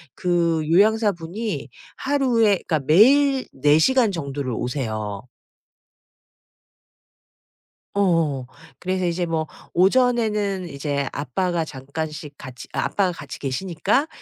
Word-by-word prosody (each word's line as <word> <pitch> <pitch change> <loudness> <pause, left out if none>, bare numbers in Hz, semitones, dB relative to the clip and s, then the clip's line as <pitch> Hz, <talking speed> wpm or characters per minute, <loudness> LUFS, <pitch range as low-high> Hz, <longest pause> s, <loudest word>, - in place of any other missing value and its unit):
그 170 -3 0
요양사분이 205 0 +1 0.3
하루에 260 -5 +2 0.2
그러니까 155 - +1
매일 265 - +5
4 145 +3 +4
시간 245 +5 +3
정도를 140 -6 -4
오세요. 110 -5 -3 2.7
어어어. 165 -10 +1 0.3
그래서 185 0 -1
이제 175 +1 0
뭐 160 -2 -2 0.3
오전에는 210 -2 +2
이제 140 -1 -2
아빠가 165 +5 -1
잠깐씩 150 +1 -6
같이 130 -1 -10
아빠가 195 -3 0
같이 145 -4 -8
계시니까 185 - -1
170 Hz, 230 characters per minute, -22 LUFS, 145-210 Hz, 2.7 s, 매일